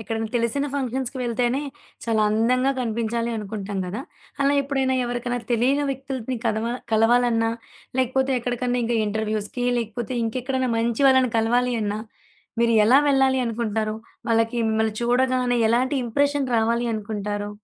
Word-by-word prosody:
ఎక్కడైనా 225 0 -3
తెలిసిన 235 +5 0
ఫంక్షన్స్‌కి 260 -1 -2
వెళ్తేనే, 240 +3 0 0.4
చాలా 225 -2 +1
అందంగా 250 +5 +2
కనిపించాలి 230 0 -1
అనుకుంటాం 205 -2 -5
కదా! 195 +6 -4 0.4
అలా 280 0 +3
ఎప్పుడైనా, 270 -1 0
ఎవరికైనా 245 0 -2
తెలియని 260 +5 +2
వ్యక్తులని 260 -2 -4
కలవ 220 0 0 0.3
కలవాలన్నా 225 0 +3 0.5
లేకపోతే 260 +1 +1
ఎక్కడికన్నా 245 +1 -1
ఇంకా 235 0 0
ఇంటర్‌వ్యుస్‌కి 215 +2 -2
లేకపోతే 235 +1 -4
ఇంకెక్కడైనా 255 +2 -1
మంచి 230 +3 0
వాళ్ళని 260 -2 +4
కలవాలి 245 +2 +2
అన్నా, 210 +1 -2 0.6
మీరు 235 0 +3
ఎలా 255 +5 +7
వెళ్ళాలి 270 -1 +3
అనుకుంటారూ? 220 -2 -2 0.3
వాళ్ళకి 225 +1 +2
మిమ్మల్ని 220 -1 0
చూడగానే 250 0 +2
ఎలాంటి 255 +5 +2
ఇంప్రెషన్ 280 +2 0
రావాలి 230 +2 +1
అనుకుంటారు? 205 -1 -4
235 Hz, 125 wpm, -23 LUFS, 220-255 Hz, 0.6 s, ఎలా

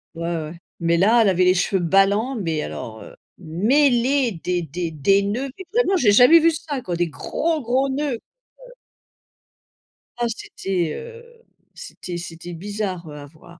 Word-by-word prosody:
Ouais, 165 - -7 0.2
ouais. 160 +2 -7 0.2
Mais 170 0 +1
là, 225 +6 +4
elle 205 - +4
avait 185 0 +2
les 185 - +5
cheveux 180 +1 +1
ballants, 200 +8 +2
mais 165 -7 -2
alors, 110 -6 -7
heu, - - -12 0.2
mêlés, 240 - +2
des 180 -1 0
des 165 +2 -4
des 195 +7 +2
noeuds, 245 +7 -2
mais 380 - -9
vraiment, 390 -6 +2
j'ai 220 -10 +4
jamais 250 +10 +7
vu 330 +1 +4
ça 300 -4 -5
quoi, 175 -5 -4
des 175 0 0
gros 305 - -2
gros 260 +4 +1
noeuds. 280 +1 -1
Heu 230 - -10 2.0
Ah 240 - 0
c'était, 185 -6 -3
heu, 470 0 -11 0.3
c'était 180 - -8
c'était 175 0 -8
bizarre, 190 -1 -5
heu, 150 - -9
à 145 - -9
voir. 170 +4 -17
200 Hz, 170 wpm, -22 LUFS, 170-270 Hz, 2.0 s, jamais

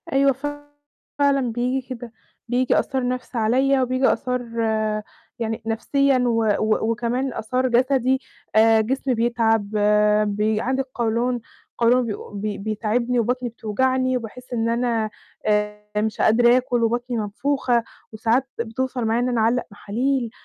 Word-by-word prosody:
أيوه 275 0 +4
ف 270 +3 -4 0.7
فعلًا 275 -4 +2
بييجي 250 +3 -1
كده، 245 -2 -7 0.3
بييجي 250 +1 +2
آثار 260 -3 -1
نفْس 255 0 -4
عليَّ، 260 +4 +2
وبييجي 255 +1 +2
آثار 250 -1 -2 1.0
يعني 225 -1 -3
نفسيًا 270 +5 +1
و 235 -2 +1 0.2
و 215 +1 +1
وكمان 240 +3 -1
آثار 255 +4 -1
جسدي، 255 +1 +2 0.4
آآ، 220 0 +6
جسمي 265 +3 -1
بيتعب، 225 -3 +1 0.6
بي 210 +1 0
عندي 260 +2 0
القولون؛ 240 -1 -1 0.3
القولون 240 +1 +3
بي 215 -3 -3 0.2
بي 210 -1 -2
بيتعبني 220 +4 -1
وبطني 245 +2 -1
بتوجعني، 255 +3 0
وباحس 245 +2 -9
إن 230 -1 0
أنا 230 -2 0 0.9
مش 215 0 -1
آآ، - - +4
قادرة 240 +2 +5
آكل 245 -2 0
وبطني 240 +1 -1
منفوخة، 240 +3 0 0.3
وساعات 230 +4 +1
بتوصَل 240 +1 -2
معايا 225 +2 +1
إن 250 - 0
أنا 240 -2 +1
أعلّق 235 +3 +2
محاليل. 240 +5 -1
240 Hz, 135 wpm, -22 LUFS, 225-255 Hz, 1.0 s, آآ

